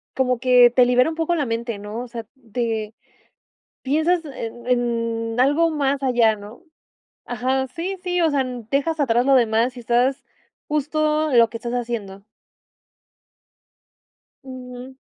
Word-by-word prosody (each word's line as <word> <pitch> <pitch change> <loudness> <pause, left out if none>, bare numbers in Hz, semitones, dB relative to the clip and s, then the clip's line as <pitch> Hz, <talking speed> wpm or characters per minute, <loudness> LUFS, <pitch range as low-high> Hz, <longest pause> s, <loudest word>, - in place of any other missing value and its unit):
como 255 -2 +1
que 250 -1 +6
te 250 +1 +5
libera 250 +3 +3
un 325 - -5
poco 330 +1 0
la 300 -4 0
mente, 230 -1 -3
¿no?, 210 +3 -6
o 250 - -7
sea, 230 -1 -7 0.3
te 225 -3 -2 0.9
piensas 315 +5 +1
en 240 -4 -7
en 230 -1 -1
algo 290 +6 +3
más 280 -2 -1
allá, 240 -4 +3
¿no?, 210 +7 -12 0.6
ajá, 260 +2 -1
sí, 355 +8 -5
sí, 360 -1 0
o 330 - +3
sea, 280 -3 +1
mm, 250 -3 -7
dejas 310 +4 0
atrás 245 -3 +2
lo 275 - +4
demás 235 +1 +2
y - - -8
estás 245 +3 +1 0.4
justo, 305 +1 0
en 245 - +5
lo 230 -1 +5
que 230 - -6
estás 235 +1 -5
haciendo. 230 -5 -4 2.2
Ujú. 255 0 -10
250 Hz, 150 wpm, -22 LUFS, 235-285 Hz, 2.2 s, que